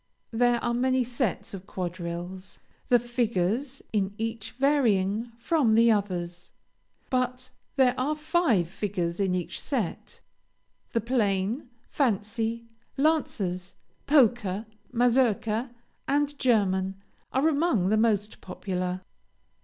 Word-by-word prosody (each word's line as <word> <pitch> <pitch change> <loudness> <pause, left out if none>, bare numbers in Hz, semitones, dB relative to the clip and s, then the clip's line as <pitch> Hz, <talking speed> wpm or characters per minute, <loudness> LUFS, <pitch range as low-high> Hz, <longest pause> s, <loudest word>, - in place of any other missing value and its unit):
There 240 +1 +3
are 240 - +1
many 255 +1 +2
sets 240 -5 -2
of 195 0 -8
quadrilles, 180 +1 -5 0.3
the 245 - +7
figures 240 +2 -1
in 200 -1 0
each 225 -1 -3
varying 235 -6 +2
from 240 -2 +2
the 230 +1 +6
others. 180 -4 -2 0.6
But 255 0 -1 0.2
there 260 -3 +4
are 290 +4 +1
five 305 - +2
figures 180 -2 -3
in 190 -2 +1
each 180 -2 -3
set. 240 - -3 0.7
The 230 - +2
plain, 220 0 0 0.2
fancy, 225 -2 -1 0.3
Lancers, 200 - 0 0.3
Polka, 235 -8 +3 0.3
Mazourka, 240 -1 +2 0.4
and 290 +1 +1
German, 195 -6 +2 0.4
are 270 +4 +2
among 285 - +2
the 215 - +3
most 215 -2 +1
popular. 185 -1 -3
225 Hz, 105 wpm, -27 LUFS, 190-255 Hz, 0.7 s, the